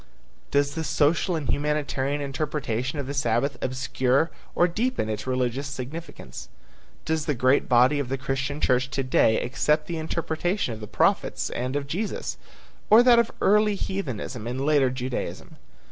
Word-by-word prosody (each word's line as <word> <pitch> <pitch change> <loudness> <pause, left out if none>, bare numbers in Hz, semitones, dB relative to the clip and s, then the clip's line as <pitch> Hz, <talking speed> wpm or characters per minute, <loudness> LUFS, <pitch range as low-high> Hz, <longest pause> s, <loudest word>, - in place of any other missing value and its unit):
Does 145 0 +1
the 160 +1 -3
social 150 +4 +2
and 155 -4 -3
humanitarian 145 -1 -1
interpretation 140 -2 -2
of 140 - -3
the 140 - -4
Sabbath 135 0 0
obscure 130 +3 0 0.2
or 175 - +4
deepen 215 - -1
its 110 +3 -4
religious 130 +2 -1
significance? 140 +5 -8 0.6
Does 160 -1 -1
the 150 - +1
great 130 +3 +2
body 125 +4 +5
of 135 -3 -3
the 135 - -1
Christian 135 +2 -3
church 125 -1 +2
to 135 -1 -2
day 115 -3 +3
accept 150 +5 0
the 165 -1 -4
interpretation 160 - -2
of 110 - -8
the 105 - -7
prophets - - +1
and 125 +3 -3
of 145 -1 -1
Jesus, 190 +10 -3 0.5
or 225 +3 +8
that 245 -2 +6
of 235 - +2
early 210 +1 +4
heathenism 130 - -4
and 130 +3 -2
later 145 -3 +4
Judaism? 130 0 -5
140 Hz, 160 wpm, -25 LUFS, 130-160 Hz, 0.6 s, or